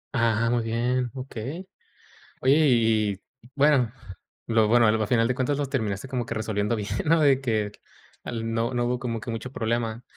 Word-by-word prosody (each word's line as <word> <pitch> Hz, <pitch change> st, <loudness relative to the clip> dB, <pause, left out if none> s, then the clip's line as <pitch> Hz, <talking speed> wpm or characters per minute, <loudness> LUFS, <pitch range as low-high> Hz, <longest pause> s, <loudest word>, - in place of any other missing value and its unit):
Ajá, 115 Hz, -2 st, +3 dB
ajá, 115 Hz, +2 st, +1 dB
muy 120 Hz, -1 st, +1 dB
bien, 120 Hz, +2 st, 0 dB
okey. 135 Hz, -, -6 dB, 0.7 s
Oye, 135 Hz, +2 st, +4 dB
y 110 Hz, -3 st, +3 dB, 0.3 s
y 120 Hz, -, -19 dB
bueno, 140 Hz, -5 st, +3 dB, 0.6 s
lo 110 Hz, -2 st, +3 dB
bueno, 120 Hz, 0 st, +5 dB
al 110 Hz, 0 st, +2 dB
final 115 Hz, 0 st, +3 dB
de 125 Hz, -, 0 dB
cuentas 130 Hz, +2 st, 0 dB
lo 145 Hz, -, 0 dB
terminaste 110 Hz, -4 st, -2 dB
como 125 Hz, -2 st, -3 dB
que -, -, -4 dB
resolviendo 110 Hz, 0 st, -1 dB
bien, 105 Hz, -1 st, -4 dB, 0.2 s
¿no? 165 Hz, +1 st, +4 dB
De 135 Hz, -3 st, +4 dB
que 110 Hz, -5 st, -1 dB, 0.5 s
al 115 Hz, -1 st, -4 dB
no 115 Hz, +2 st, -1 dB
no 120 Hz, 0 st, 0 dB
hubo 125 Hz, +1 st, 0 dB
como 120 Hz, -3 st, -3 dB
que 110 Hz, -, -8 dB
mucho 115 Hz, +2 st, -5 dB
problema. 115 Hz, -1 st, -2 dB
120 Hz, 190 wpm, -25 LUFS, 110-130 Hz, 0.7 s, bueno